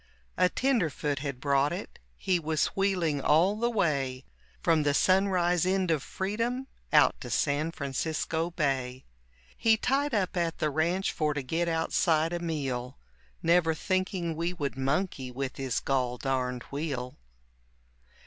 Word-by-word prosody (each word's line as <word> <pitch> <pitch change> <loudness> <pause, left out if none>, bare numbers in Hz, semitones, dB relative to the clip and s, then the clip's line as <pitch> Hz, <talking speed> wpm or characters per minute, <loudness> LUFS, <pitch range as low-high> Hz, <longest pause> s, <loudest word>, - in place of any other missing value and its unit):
A 180 - +3
tenderfoot 165 - 0
had 140 -3 -4
brought 140 +1 +2
it, - - -6 0.2
he 180 - +1
was 155 -1 0
wheeling 180 -7 +1
all 170 +9 +4
the 235 +2 0
way 140 - 0 0.4
From 165 -2 +3
the 145 -1 +1
sun 190 +4 +4
rise 175 -2 +2
end 185 -1 +1
of 155 -4 +1
freedom 230 - -2 0.3
out - - +4
to - - -6
San 150 +2 +1
Francisco 160 +3 -2
Bay. 135 -6 -2 0.5
He 225 -1 +3
tied 275 +3 +1
up 190 -3 0
at 170 -2 -1
the 155 -3 0
ranch 170 +6 +1
for 150 -3 -1
to 140 - -2
get 165 +6 -1
outside 165 0 +1
a 175 - -1
meal, 135 - -3 0.5
Never 165 -1 +3
thinking 185 -2 -1
we 170 +2 -1
would 145 -7 -3
monkey 135 0 -1
with 130 +1 -4
his 135 -3 -1
gol 125 -2 0
darned 125 -2 -2
wheel. 140 -4 -4
160 Hz, 150 wpm, -29 LUFS, 140-180 Hz, 0.5 s, all